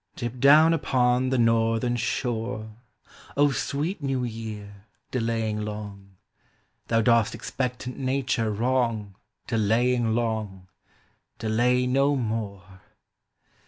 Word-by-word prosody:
Dip 120 0 -5
down 150 +5 +7
upon 125 -4 +2
the 130 - +1
northern 115 +1 +2
shore, 115 -2 -3 0.6
O 145 0 +4
sweet 150 +7 -2
new 135 -2 -1
year, 105 -3 -7 0.2
delaying 115 -3 -1
long: 100 -2 -7 0.7
Thou 115 -1 +2
dost 115 -1 +3
expectant 125 0 -4
Nature 130 -3 0
wrong; 115 -2 0 0.3
Delaying 115 +1 +1
long, 110 -5 -3 0.7
delay 120 +3 +1
no 135 +3 +2
more. 100 -6 -4
115 Hz, 95 wpm, -26 LUFS, 110-125 Hz, 0.7 s, down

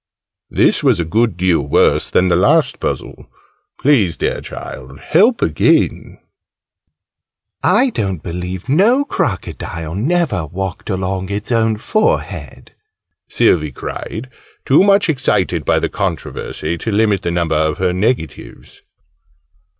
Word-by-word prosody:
This - - +2
was - - +3
a 85 - 0
good 110 +3 +1
deal 90 -3 +2
worse 70 +1 +2
than 90 - +2
the 85 - +3
last 140 - +2
puzzle. - - -5 0.5
Please, 115 - +2
dear - - -2
Child, 65 +1 -9
help 200 - +3
again! - - +1 1.4
"I 260 0 +3
don't 95 - -3
believe 90 +2 -5
no 215 - +3
Crocodile 85 - -3
never 135 - 0
walked 95 +4 -5
along 95 -1 -2
its 105 +3 -4
own 115 -1 +2
forehead!" 215 - -2 0.6
Sylvie 80 -10 +2
cried, 110 - -6 0.4
too 140 +7 +5
much 200 0 +4
excited 145 -6 0
by - - +2
the - - 0
controversy 85 +2 -4
to 115 - -3
limit 105 -2 +2
the - - -2
number 85 -2 0
of 80 +1 +1
her 90 -1 0
negatives. 90 - -3
95 Hz, 125 wpm, -17 LUFS, 85-130 Hz, 1.4 s, too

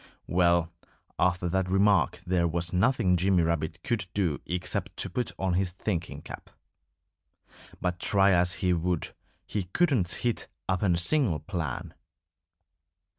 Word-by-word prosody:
Well, 85 -1 +2 0.5
after 90 0 +2
that 95 +1 0
remark 100 +1 +3
there 90 -1 +2
was 85 +2 -2
nothing 95 -2 +3
Jimmy 90 0 +3
Rabbit 80 -1 -2
could 120 -9 -1
do 90 -8 0
except 90 +1 -2
to - - -2
put 125 -1 -1
on 95 -2 0
his 95 +1 +1
thinking 90 -3 -4
cap. - - -9 1.3
But 90 -1 -2
try 100 +1 +4
as 90 0 +3
he 90 - +4
would, 85 0 -1 0.3
he 100 -3 -3
couldn't 120 - +1
hit 120 +4 -2 0.2
upon 95 -1 +1
a - - 0
single 100 - +3
plan. 80 -1 -4
90 Hz, 135 wpm, -28 LUFS, 85-100 Hz, 1.3 s, try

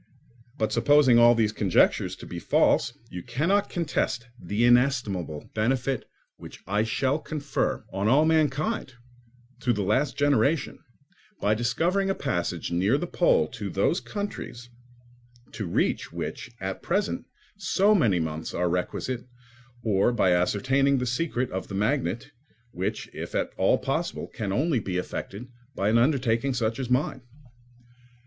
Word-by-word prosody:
But 110 -4 0
supposing 130 0 +5
all 120 0 +7
these 110 -2 +2
conjectures 100 -4 +2
to - - -11
be - - -6
false, - - +2
you 90 - -6
cannot 190 - 0
contest 150 -8 -1 0.2
the 100 +6 0
inestimable 120 - +1
benefit 125 +3 0 0.3
which - - -11
I 105 +3 +1
shall 130 +6 0
confer 150 -2 -2
on 100 +2 0
all 140 +7 +5
mankind, 155 - 0 0.6
to 125 -1 +1
the 105 -3 0
last 130 +9 +1
generation, 145 +1 +1 0.6
by 105 - +2
discovering 165 - 0
a 195 - +1
passage 85 -1 -2
near 95 +9 +2
the 175 - -2
pole 485 - +2
to - - -6
those - - +1
countries, 160 - -6 0.8
to 105 -5 -5
reach - - 0
which 120 0 -5
at 95 0 -4
present 200 +4 -1 0.3
so 200 +1 +2
many 115 - +3
months 80 0 -4
are 90 0 +1
requisite; 120 +8 -3 0.6
or 105 +1 +2
by 105 -6 +2
ascertaining 130 +10 +2
the 125 - -1
secret 125 0 -1
of 95 - -4
the 100 - -6
magnet, 120 +5 -1 0.4
which, 95 -4 -3
if - - -6
at - - 0
all - - +3
possible, - - -2
can 105 -3 -5
only 140 - +1
be 95 -4 -3
effected 100 +5 -5 0.3
by 100 - +1
an 115 +2 +4
undertaking 125 -1 +1
such 115 -1 -1
as 130 -2 -3
mine. 130 +1 0
120 Hz, 145 wpm, -26 LUFS, 105-145 Hz, 0.8 s, all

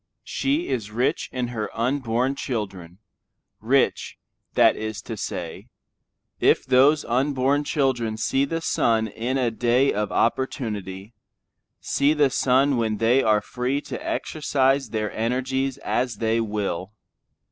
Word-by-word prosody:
She 290 +5 -1
is 110 -5 -2
rich 120 +4 -1
in 125 -2 -2
her 110 -3 -3
unborn 125 +1 0
children; 95 - -5 0.6
rich, 130 +5 +1 0.4
that - - +5
is 110 -1 -5
to 115 - -6
say, 90 -5 -6 0.7
if - - +3
those 135 +4 +4
unborn 135 +3 +1
children 125 -8 0
see 135 +4 +1
the 165 +4 -2
sun 115 -7 +1
in 120 +5 -3
a 125 -3 +1
day 120 +4 +2
of 105 0 -2
opportunity, 105 -5 -2 0.7
see 145 +2 +2
the 145 -3 +3
sun 135 +1 +3
when 110 -2 0
they 120 +5 +3
are 105 -3 +3
free 125 +3 -2
to - - -7
exercise 135 -4 0
their 105 -1 -2
energies 130 +3 -1
as 125 -3 -1
they 110 +2 0
will. 105 -3 -3
120 Hz, 130 wpm, -24 LUFS, 110-135 Hz, 0.7 s, that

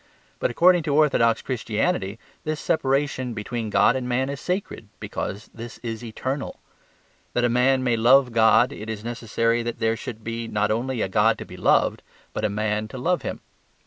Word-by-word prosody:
But - - +1
according 175 +7 +5
to 140 - +2
orthodox 135 -7 +3
Christianity 110 - -1 0.3
this 155 0 -2
separation 135 -4 0
between 115 +1 -4
God 120 - +4
and 125 -1 -3
man 130 +2 0
is 140 -1 -5
sacred, 180 - -3
because 105 +3 -5
this 115 0 -8
is 115 0 -5
eternal. 130 +4 -4 0.7
That 120 - +1
a 120 - +3
man 130 +2 +3
may 120 -2 +2
love 125 +3 +5
God 115 +3 +5
it 110 -4 -8
is 110 -1 -5
necessary 115 0 0
that 120 0 -4
there 115 0 +1
should 115 -1 -8
be 115 +1 -4
not 105 -1 0
only 120 +2 -1
a - - 0
God 95 - +3
to - - -7
be - - -11
loved, - - +2 0.3
but - - -3
a 110 - +2
man 105 +1 -1
to 120 - -9
love 175 +8 0
him. - - -5
120 Hz, 185 wpm, -24 LUFS, 110-130 Hz, 0.7 s, according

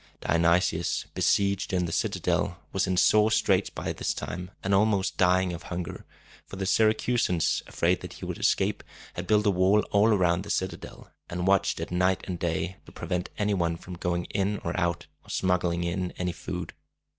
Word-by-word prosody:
Dionysius, 85 0 +1
besieged 100 -1 +1
in 90 -1 +1
the 85 - -4
citadel, 85 +1 0 0.2
was 95 0 +1
in 95 -1 0
sore 105 +3 +5
straits 110 - +2
by - - -4
this - - -2
time, 90 +2 -5
and 95 - 0
almost 100 -1 +2
dying 90 0 +3
of 85 - -6
hunger; 85 -1 -5 0.4
for - - -9
the 95 0 -3
Syracusans, 110 -3 +2
afraid - - +1
that - - -8
he - - -8
would - - -5
escape, - - +1 0.3
had 90 +1 -6
built 105 0 +3
a 100 - +4
wall 95 +3 +4
all 100 +2 +4
around 90 -5 +3
the 100 - -9
citadel, 95 -1 -4 0.2
and 90 +1 -3
watched 95 0 +2
it - - -5
night 90 +1 +1
and 90 -3 -4
day, 85 +2 -2
to - - -12
prevent 90 0 -3
any 105 0 +1
one 85 -3 0
from 90 +1 -10
going 85 0 -2
in 100 +1 0
or 85 - -3
out, 85 -1 -1 0.2
or - - -19
smuggling 85 -2 0
in 90 +1 -2
any 90 -1 -1
food. 90 0 -6
90 Hz, 185 wpm, -27 LUFS, 85-100 Hz, 0.4 s, sore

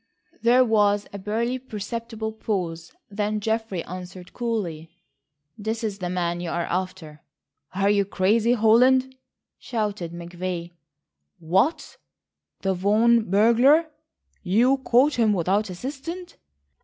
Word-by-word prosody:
There 245 +2 +5
was 205 -2 +2
a 200 - -6
barely 230 +6 -2
perceptible 225 -1 -5
pause. 180 -7 -4 0.2
Then 210 +1 -1
Geoffrey 220 -4 -2
answered 180 0 -9
coolly: 190 -10 -3 0.7
"That 220 +2 -3
is 205 -2 -3
the 180 -1 -3
man 175 -1 -2
you 175 - -4
are 170 0 -2
after." 180 -5 -4 0.5
"Are 195 +1 +1
you 200 -1 +3
crazy, 215 +5 +2
Holland?" 255 +3 +4 0.4
shouted 210 -7 -3
McVay. 175 0 -5 0.7
"What, 190 - 0 0.6
the 195 -1 0
Vaughan 215 +4 +3
burglar? 245 - +4 0.5
You 235 +8 +3
caught 260 +2 +3
him 220 -2 +4
without 195 +3 0
assistance?" 285 - -7
210 Hz, 115 wpm, -24 LUFS, 185-235 Hz, 0.7 s, There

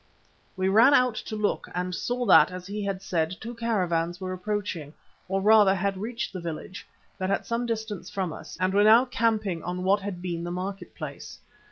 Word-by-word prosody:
We 190 0 +1
ran 230 +8 +6
out 250 -2 +4 0.2
to 215 - -3
look 210 -1 -1
and 180 0 -2
saw 245 +6 -2
that, 195 - +7
as 180 0 -8
he 205 +2 -4
had 195 -1 -3
said, 165 0 -1
two 235 +2 -6
caravans 180 -7 -1
were 185 -1 -4
approaching, 185 -6 -4 0.3
or 195 +1 -1
rather 210 -2 +6
had 195 +1 -1
reached 225 +4 -4
the 185 - -5
village, 170 +3 -7 0.3
but 185 0 -1
at 195 - 0
some 235 +1 -2
distance 220 -5 -4
from 185 -5 -3
us, - - -10
and 185 +1 +1
were 205 +1 +4
now 225 +4 +7
camping 220 -8 0
on 180 +1 -4
what 200 +2 +3
had 200 -1 -4
once 175 - -12
been 170 -2 -3
the 175 - -4
market 185 +1 -5
place. 145 -4 -8
195 Hz, 205 wpm, -26 LUFS, 180-215 Hz, 0.3 s, that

